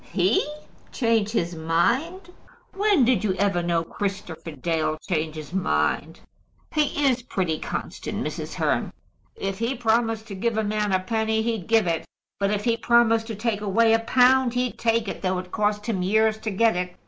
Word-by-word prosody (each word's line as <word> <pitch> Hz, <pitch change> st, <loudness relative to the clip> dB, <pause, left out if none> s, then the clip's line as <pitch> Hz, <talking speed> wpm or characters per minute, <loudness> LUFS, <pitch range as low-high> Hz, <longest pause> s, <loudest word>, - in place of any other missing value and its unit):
"He 185 Hz, +3 st, +3 dB, 0.5 s
change 230 Hz, -4 st, +1 dB
his 175 Hz, -6 st, -1 dB
mind! 235 Hz, -, 0 dB, 0.4 s
When 395 Hz, -, +3 dB
did 235 Hz, -5 st, +2 dB
you 195 Hz, -3 st, +1 dB
ever 195 Hz, -2 st, +1 dB
know 170 Hz, -1 st, 0 dB
Christopher 185 Hz, -3 st, -5 dB
Dale 155 Hz, +1 st, -1 dB
change 155 Hz, -3 st, -1 dB
his 155 Hz, +1 st, -8 dB
mind?" 190 Hz, -1 st, 0 dB, 0.5 s
"He 295 Hz, -1 st, +1 dB
is 255 Hz, -2 st, +2 dB
pretty 180 Hz, -9 st, -2 dB
constant, -, -, -5 dB
Mrs. -, -, -5 dB
Hearn." -, -, 0 dB, 0.4 s
"If 195 Hz, 0 st, -4 dB
he 230 Hz, +4 st, -1 dB
promised 225 Hz, -2 st, +1 dB
to -, -, -5 dB
give 220 Hz, +3 st, -1 dB
a 220 Hz, -, +1 dB
man 210 Hz, -1 st, -1 dB
a 185 Hz, -, +3 dB
penny, 220 Hz, +2 st, 0 dB
he'd 225 Hz, -6 st, -2 dB
give 225 Hz, -3 st, +4 dB
it. 165 Hz, -2 st, -1 dB, 0.3 s
But 200 Hz, 0 st, +1 dB
if 210 Hz, 0 st, -1 dB
he 235 Hz, -1 st, +1 dB
promised 230 Hz, -1 st, +3 dB
to 225 Hz, -, -4 dB
take 210 Hz, 0 st, -2 dB
away 225 Hz, +3 st, +3 dB
a 225 Hz, -, +4 dB
pound, 250 Hz, +1 st, +3 dB
he'd 250 Hz, -1 st, -1 dB
take 230 Hz, -1 st, +1 dB
it, -, -, -5 dB
though 185 Hz, -1 st, 0 dB
it 180 Hz, 0 st, -7 dB
cost 210 Hz, -1 st, 0 dB
him 210 Hz, -6 st, -1 dB
years 220 Hz, +3 st, +2 dB
to 220 Hz, -, -3 dB
get 220 Hz, +2 st, +2 dB
it. 180 Hz, 0 st, -3 dB
215 Hz, 185 wpm, -24 LUFS, 185-230 Hz, 0.5 s, give